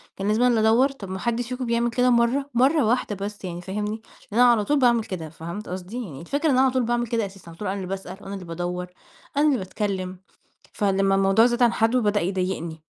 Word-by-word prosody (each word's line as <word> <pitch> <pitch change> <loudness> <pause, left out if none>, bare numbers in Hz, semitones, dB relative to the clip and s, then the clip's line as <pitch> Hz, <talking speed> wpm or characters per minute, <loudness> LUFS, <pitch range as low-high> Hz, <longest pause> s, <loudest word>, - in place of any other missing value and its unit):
كان 195 - -3
لازم 215 +3 +2
أنا - - +5
اللي 220 -2 +3
أدوَّر! 250 +5 +4
طب 205 -9 -9
ما 190 - -4
حدش 235 +1 -2
فيكم 255 0 -3
بيعمل 235 0 +1
كده 250 +2 +2
مرة! 245 +4 +2
مرة 270 +4 +3
واحدة 225 -2 0
بس 205 -1 -7
يعني 175 -1 -5
فاهمني؟ 210 +4 -4 0.3
لأن 235 - +3
أنا 245 -1 +7
على 215 -3 +2
طول 295 -1 +2
باعمل 240 -3 +4
كده 170 -6 -6
فهمت 170 +6 -7
قصدي؟ 190 +7 -5
يعني 155 -7 -9
الفكرة 285 - -3
إن 260 - +3
أنا - - +5
على 265 -1 +4
طول 255 -1 +1
باعمل 240 +1 0
كده 230 -1 0
أساسًا 195 -3 -11
على 165 - -12
طول 210 - -4
أنا 195 +2 -2
اللي 185 -2 -5
باسأل 190 -1 -6
أنا 195 - -7
اللي 195 -2 -7
بادوَّر 175 +2 -4 0.5
أنا 295 - +4
اللي 285 -3 +3
باتكلم، 185 -2 -3 0.5
فلما 195 -1 +2
الموضوع 195 +3 +4
زاد 240 0 +2
عن 235 -1 +4
حده 230 +3 +2
بدأ 205 -1 +1
يضايقني. 180 -3 -3
210 Hz, 240 wpm, -24 LUFS, 190-240 Hz, 0.5 s, أنا